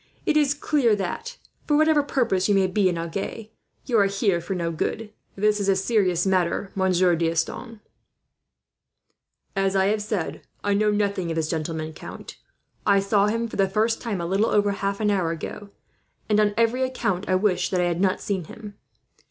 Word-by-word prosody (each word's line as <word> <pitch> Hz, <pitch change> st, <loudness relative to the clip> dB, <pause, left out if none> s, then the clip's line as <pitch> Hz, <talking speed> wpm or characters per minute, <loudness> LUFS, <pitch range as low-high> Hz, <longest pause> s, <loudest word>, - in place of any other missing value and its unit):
"It 310 Hz, -, +1 dB
is 290 Hz, -2 st, +3 dB
clear 280 Hz, -7 st, +2 dB
that, 325 Hz, -, -5 dB, 0.3 s
for 295 Hz, -, +3 dB
whatever 310 Hz, -1 st, +4 dB
purpose 235 Hz, -9 st, 0 dB
you 205 Hz, -, +4 dB
may 195 Hz, -1 st, +4 dB
be 185 Hz, +1 st, +2 dB
in 175 Hz, -, -2 dB
Agen, 195 Hz, +6 st, -5 dB, 0.4 s
you 240 Hz, -4 st, +2 dB
are 200 Hz, -, +4 dB
here 195 Hz, -3 st, 0 dB
for 185 Hz, +3 st, -4 dB
no 170 Hz, -2 st, -2 dB
good. 210 Hz, +6 st, -3 dB, 0.2 s
"This 210 Hz, +1 st, +2 dB
is 200 Hz, -1 st, 0 dB
a 195 Hz, -, +4 dB
serious 190 Hz, -3 st, +1 dB
matter, 185 Hz, +1 st, 0 dB
Monsieur 185 Hz, -2 st, +2 dB
D'Estanges." 170 Hz, +7 st, -2 dB, 1.7 s
"As 195 Hz, 0 st, +1 dB
I 190 Hz, 0 st, +3 dB
have 215 Hz, -, -2 dB
said, 205 Hz, -5 st, -3 dB, 0.2 s
I 205 Hz, -, +1 dB
know 210 Hz, +1 st, +2 dB
nothing 200 Hz, -4 st, 0 dB
of 165 Hz, -, -2 dB
this 160 Hz, -1 st, -1 dB
gentleman, 160 Hz, -1 st, -3 dB
count. -, -, -10 dB, 0.5 s
I 200 Hz, -1 st, +4 dB
saw 200 Hz, +1 st, +2 dB
him 230 Hz, +2 st, -1 dB
for -, -, -8 dB
the 195 Hz, -1 st, +2 dB
first 220 Hz, +3 st, 0 dB
time 215 Hz, -5 st, -3 dB
a 170 Hz, -, -3 dB
little 195 Hz, +6 st, +1 dB
over 205 Hz, -1 st, +2 dB
half 200 Hz, 0 st, -2 dB
an 210 Hz, -1 st, +2 dB
hour 185 Hz, -5 st, +1 dB
ago, 170 Hz, +5 st, -6 dB, 0.6 s
and 210 Hz, -1 st, +3 dB
on 210 Hz, -1 st, +2 dB
every 230 Hz, +2 st, +2 dB
account 205 Hz, -8 st, -1 dB
I 185 Hz, -, +3 dB
wish 190 Hz, -1 st, +1 dB
that 185 Hz, -, 0 dB
I -, -, +2 dB
had 175 Hz, 0 st, -1 dB
not 190 Hz, -1 st, +1 dB
seen 190 Hz, -5 st, -2 dB
him. 205 Hz, +4 st, -11 dB
200 Hz, 195 wpm, -24 LUFS, 185-215 Hz, 1.7 s, whatever